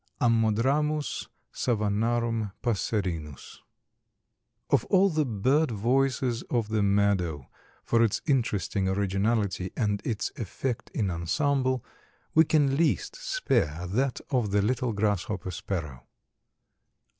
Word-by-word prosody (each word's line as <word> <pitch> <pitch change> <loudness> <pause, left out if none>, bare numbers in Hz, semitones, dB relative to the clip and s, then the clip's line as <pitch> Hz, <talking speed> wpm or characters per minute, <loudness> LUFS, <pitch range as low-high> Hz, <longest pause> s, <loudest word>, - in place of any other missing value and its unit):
(Ammodramus 125 +7 +1 0.3
savannarum 115 -1 0
passerinus.) 90 - -2 1.1
Of - - +4
all 195 0 +4
the 155 -1 +1
bird 130 +8 +2
voices 125 +2 +1
of 115 -4 0
the 110 -1 +1
meadow, 100 -8 +1 0.4
for 115 - +2
its 115 -3 +2
interesting 105 - 0
originality 100 0 0
and 105 -3 0
its 110 -3 -2
effect 120 +3 -4
in 100 -4 0
ensemble, 130 - 0 0.5
we 160 +1 +6
can 145 -3 +2
least 400 - +1
spare - - -1
that 125 +8 0
of 125 -6 +1
the 100 0 +2
little 125 +2 0
Grasshopper 100 -3 -1
Sparrow. 80 -9 -5
115 Hz, 105 wpm, -27 LUFS, 100-130 Hz, 1.1 s, we